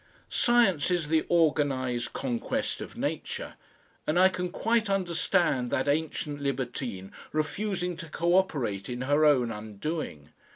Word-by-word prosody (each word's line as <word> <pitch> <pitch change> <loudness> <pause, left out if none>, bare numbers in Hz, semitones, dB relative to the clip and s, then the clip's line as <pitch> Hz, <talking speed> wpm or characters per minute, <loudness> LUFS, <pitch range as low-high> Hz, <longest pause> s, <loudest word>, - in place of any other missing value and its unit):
Science 230 -11 +3
is 175 -4 0
the 160 0 +2
organised 140 -7 +1
conquest 125 -4 -2
of - - -8
Nature, - - -3 0.5
and 155 - +1
I 185 +1 +7
can 180 -1 -3
quite 225 +3 +1
understand 175 -8 +1
that 135 +2 0
ancient 145 -1 -1
libertine 125 -7 -3 0.2
refusing 180 +3 -1
to 165 - -8
co 170 +3 +1
operate 130 - 0
in 125 0 -4
her 145 +4 +3
own 130 -6 +4
undoing. 105 - -5
150 Hz, 130 wpm, -28 LUFS, 130-175 Hz, 0.5 s, I